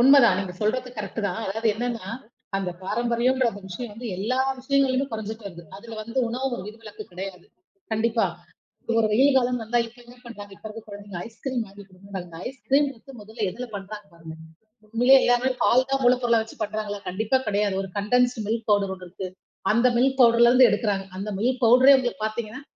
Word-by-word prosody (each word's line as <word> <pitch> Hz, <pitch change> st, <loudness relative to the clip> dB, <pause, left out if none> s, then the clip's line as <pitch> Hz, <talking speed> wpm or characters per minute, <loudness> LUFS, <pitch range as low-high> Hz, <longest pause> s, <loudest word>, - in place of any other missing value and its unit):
உண்ம 270 Hz, +3 st, +8 dB
தான். 205 Hz, -5 st, +5 dB
நீங்கச் 180 Hz, -2 st, -5 dB
சொல்றது 250 Hz, +4 st, 0 dB
கரக்ட்டு 210 Hz, +1 st, -4 dB
தான். 200 Hz, +2 st, -3 dB
அதாவது 225 Hz, +4 st, -1 dB
என்னன்னா, 230 Hz, -3 st, -3 dB, 0.5 s
அந்தப் 180 Hz, -3 st, -3 dB
பாரம்பரியம்ன்ற 240 Hz, +4 st, +1 dB, 0.2 s
விஷயம் 210 Hz, +4 st, -6 dB
வந்து 240 Hz, +3 st, -8 dB
எல்லா 235 Hz, +7 st, -1 dB, 0.2 s
விஷயங்களிலும் 270 Hz, 0 st, +1 dB
குறைஞ்சுட்டு 220 Hz, 0 st, -5 dB
வருது. 170 Hz, -3 st, -9 dB
அதுல 225 Hz, +2 st, -10 dB
வந்து 230 Hz, +4 st, -4 dB
உணவு 255 Hz, +3 st, -2 dB, 0.2 s
விதிவிலக்கு 215 Hz, 0 st, -10 dB
கெடயாது, 180 Hz, 0 st, -7 dB, 0.5 s
கண்டிப்பா. 225 Hz, -1 st, +2 dB, 0.7 s
ஒரு 230 Hz, -1 st, +3 dB
வெயில் 265 Hz, +6 st, +4 dB
காலம் 250 Hz, -2 st, +2 dB
வந்தா 235 Hz, +2 st, 0 dB
இப்ப 230 Hz, +2 st, -12 dB
என்ன 240 Hz, +1 st, -15 dB
பண்றாங்க, 205 Hz, -4 st, -10 dB
இப்ப -, -, -27 dB
இருக்குற 220 Hz, +1 st, -9 dB
குழந்தைங்க, 205 Hz, -2 st, -8 dB
ஐஸ் 225 Hz, 0 st, -15 dB
கிரீம் 255 Hz, -3 st, -1 dB
வாங்கி 200 Hz, 0 st, -13 dB
கொடுங்கன்றங்க. 195 Hz, 0 st, -9 dB
அந்த 170 Hz, -2 st, -11 dB
ஐஸ் 265 Hz, +1 st, -11 dB
கிரீம் 280 Hz, +2 st, +4 dB, 0.3 s
முதல்ல 215 Hz, +1 st, -4 dB
எதுல 245 Hz, +7 st, -6 dB
பண்றாங்க 205 Hz, +1 st, -7 dB
பாருங்க. 165 Hz, -1 st, -10 dB, 0.5 s
உண்மயிலேயே 245 Hz, +5 st, +6 dB
எல்லாமே 245 Hz, +1 st, +3 dB
பால் 255 Hz, +2 st, +4 dB
தான் 270 Hz, 0 st, +1 dB
மூலப்பொருள 245 Hz, -2 st, +4 dB
வெச்சுப் 220 Hz, 0 st, -6 dB
பண்றாங்களா, 210 Hz, -1 st, -4 dB
கண்டிப்பா 215 Hz, +7 st, +1 dB
கெடயாது. 205 Hz, -1 st, +1 dB
ஒரு 195 Hz, -, -7 dB
கண்டன்ஸ்டு 245 Hz, +2 st, +2 dB
மில்க் 225 Hz, +1 st, -2 dB
பௌடெர் 200 Hz, -2 st, +2 dB
ஒண்ணு 185 Hz, -1 st, -11 dB
இருக்கு. 185 Hz, +2 st, -6 dB, 0.5 s
அந்த 235 Hz, +3 st, +4 dB
மில்க் 265 Hz, +2 st, +2 dB
பௌடெர்ல 235 Hz, -1 st, +7 dB
இருந்து 255 Hz, 0 st, +7 dB
எடுக்குறாங்க. 205 Hz, -2 st, 0 dB
அந்த 200 Hz, +3 st, -4 dB
மில்க் 250 Hz, +5 st, 0 dB
பௌடெரே 255 Hz, +4 st, +7 dB
உங்களுக்குப் 245 Hz, -4 st, -2 dB
பாத்தீங்கன்னா, 220 Hz, +3 st, -6 dB
225 Hz, 180 wpm, -25 LUFS, 205-245 Hz, 0.7 s, உண்ம